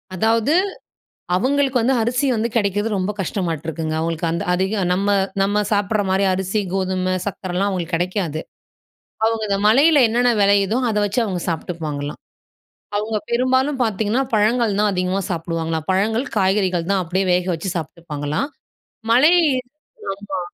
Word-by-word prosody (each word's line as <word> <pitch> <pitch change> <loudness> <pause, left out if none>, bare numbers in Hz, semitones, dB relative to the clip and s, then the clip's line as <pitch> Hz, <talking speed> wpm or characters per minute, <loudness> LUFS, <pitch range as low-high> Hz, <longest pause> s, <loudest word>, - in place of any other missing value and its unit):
அதாவது 225 - +2 0.8
அவுங்களுக்கு 265 +3 +1
வந்து 260 +3 +2
அரிசி 245 +5 0
வந்து 225 +2 0
கிடைக்கிறது 205 0 +1
ரொம்ப 190 +2 -1
கஷ்டமாட்ருக்குங்க. 165 -4 -3
அவுங்களுக்கு 165 0 -1
அந்த 170 - -2
அதிகம் 190 0 0
நம்ம 195 +2 -1 0.4
நம்ம 205 +1 +1
சாப்பிடுற 205 +1 +1
மாரி 195 +1 +2
அரிசி, 190 +3 -1
கோதுமை, 185 -1 0
சக்கரைலாம் 190 -1 -2
அவுங்களுக்கு 180 -3 -2
கிடைக்காது. 175 -3 -2 0.9
அவுங்க 225 -1 0
இந்த 195 - +1
மலையில 285 +6 +5
என்னென்ன 245 +2 +2
விளையுதோ 200 +2 +3
அதை 210 -1 0
வச்சு 205 +4 -1
அவுங்க 185 -4 -3
சாப்பிட்டுப்பாங்களாம். 155 -3 -4 0.8
அவுங்க 215 +1 -1
பெரும்பாலும் 260 +3 +1
பாத்தீங்கன்னா, 220 +3 0
பழங்கள் 220 0 +2
தான் 210 - +3
அதிகமா 185 +1 0
சாப்பிடுவாங்களாம். 165 -2 -2
பழங்கள், 220 +7 +1
காய்கறிகள் 190 -3 +1
தான் 195 -2 +2
அப்படியே 185 +3 -1
வேக 180 0 +1
வச்சு 165 +4 -4
சாப்ட்டுப்பாங்களாம். 155 - -3 0.6
மலை 295 +8 +6 0.8
ஆமா. 195 -1 -5
195 Hz, 130 wpm, -20 LUFS, 180-225 Hz, 0.9 s, மலை